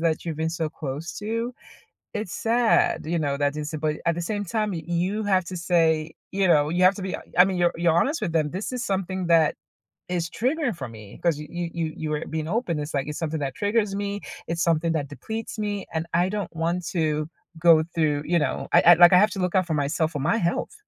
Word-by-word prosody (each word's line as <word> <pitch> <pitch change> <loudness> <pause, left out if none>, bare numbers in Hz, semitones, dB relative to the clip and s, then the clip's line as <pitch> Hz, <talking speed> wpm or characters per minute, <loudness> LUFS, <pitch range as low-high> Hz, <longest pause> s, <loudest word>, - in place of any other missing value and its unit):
that 160 -1 0
you've 165 -3 -4
been 160 +1 -1
so 165 -1 -2
close 150 +2 -5
to, 230 +3 -3 0.6
it's 210 -4 -4
sad, 245 - +2
you 170 +2 -1
know, 140 -2 -1
that 145 +1 0
it's 150 +1 -5
but 155 0 0
at 170 - +2
the 175 - -3
same 205 +4 -2
time, 210 +2 -1
y 165 - -5
you 180 +5 -1
have 190 -3 +2
to 180 +2 -6
say, 165 -2 +2 0.2
you 195 0 +1
know, 150 -4 +4
you 175 +3 +1
have 185 +2 +6
to 205 - -7
be 190 -1 -3 0.2
I 180 - +9
mean, 190 -1 -1
you're 175 -1 +3
you're 170 -1 +3
honest 280 - +1
with 180 -6 -2
them, 155 -3 +1
this 190 +7 -4
is 250 -1 -3
something 190 -3 -2
that 165 -2 +4 0.5
is 170 -2 -2
triggering 260 - 0
for 170 - -6
me 110 -3 -12
'cause 170 -4 +2
you 150 - -7
you 170 -2 -3
you 155 - -4
were 150 +1 -2
being 155 0 -3
open, 195 -5 -1
it's 150 +1 -5
like, 140 -1 0
it's 150 - -4
something 160 -2 -2
that 135 -2 -3
triggers 205 -1 0
me, 200 0 -3 0.3
it's 170 0 -1
something 165 -1 +2
that 150 -3 -2
depletes 220 +10 -6
me, 205 -2 -2
and 160 0 -2
I 175 +2 +3
don't 205 -4 -4
want 170 +2 -1
to 155 -3 -1 0.3
go 160 -1 +6
through, 150 -3 +1
you 170 +2 +2
know, 150 - -2
I - - +7
I, 175 - +10
like, 175 +1 +7
I 180 - +8
have 210 +3 +5
to - - -5
look 180 0 -1
out 185 -2 +3
for 160 - -1
myself 155 +2 0
for 145 - -3
my 170 +11 +1
health. 170 -5 -1
170 Hz, 240 wpm, -25 LUFS, 155-195 Hz, 0.6 s, I